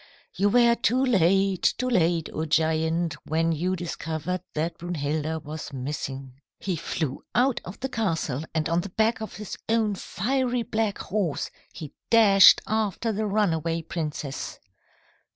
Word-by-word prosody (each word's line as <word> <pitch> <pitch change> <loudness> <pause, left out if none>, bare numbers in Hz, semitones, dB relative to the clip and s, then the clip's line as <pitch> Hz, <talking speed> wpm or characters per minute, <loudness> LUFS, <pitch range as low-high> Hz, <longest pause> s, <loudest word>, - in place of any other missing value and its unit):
"You 200 +1 +2
were 235 +1 +5
too 250 +2 +2
late, 195 -3 +3
too 255 - -1
late, 170 -7 +2
O 160 - -2
giant, 160 +1 +1
when 165 +2 +1
you 175 +4 0
discovered 170 0 -4
that 160 +3 -2
Brunhilda 160 -2 -2
was 150 0 -7
missing. 135 -1 -5 0.2
"He 190 -3 -2
flew 155 -3 -3
out 255 +1 +2
of 180 +4 -9
the 265 - -1
castle, 165 - -1
and 155 -1 +1
on 170 +1 +1
the 200 - -7
back 220 +4 +1
of 220 - -6
his 210 -2 -7
own 220 -2 +2
fiery 245 +6 -1
black 220 -2 -1
horse 190 -6 -2 0.2
he 155 -5 -9 0.2
dashed 200 -5 +7
after 220 +1 -1
the 215 0 -1
runaway 165 -5 0
princess. 150 -4 -5
175 Hz, 145 wpm, -26 LUFS, 160-215 Hz, 0.2 s, dashed